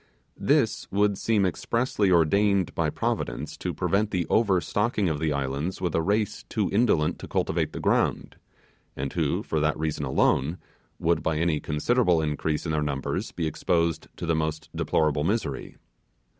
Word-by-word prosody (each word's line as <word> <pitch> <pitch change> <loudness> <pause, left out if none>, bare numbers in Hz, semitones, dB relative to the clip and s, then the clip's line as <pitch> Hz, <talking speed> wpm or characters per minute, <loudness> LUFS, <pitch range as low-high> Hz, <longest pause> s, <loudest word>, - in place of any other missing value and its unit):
This 135 -7 +1
would 100 0 +2
seem 105 0 +1
expressively 105 +2 0
ordained 95 +3 +3
by - - 0
Providence - - -3
to - - -3
prevent 105 +2 0
the 90 -4 -1
overstocking 105 0 +2
of 75 -2 -2
the 80 -1 0
islands 70 +5 -2
with 90 -3 -1
a 80 - +2
race 105 +4 0
too - - -1
indolent 100 -8 +2
to - - -8
cultivate - - 0
the - - -6
ground, - - 0 0.6
and 70 0 -4
who, - - 0
for 80 - -1
that 75 0 +1
reason 80 -1 -2
alone, 70 +3 +1 0.4
would, 80 -1 +1
by 80 -1 0
any 80 -1 +1
considerable 90 - +2
increase 75 0 -1
in 80 - -1
their 75 -1 0
numbers, 70 -3 -2
be 85 - -3
exposed 85 +1 0
to - - -4
the 85 - +1
most 80 0 -2
deplorable 75 -2 +1
misery. 95 - -2
85 Hz, 160 wpm, -26 LUFS, 75-100 Hz, 0.6 s, ordained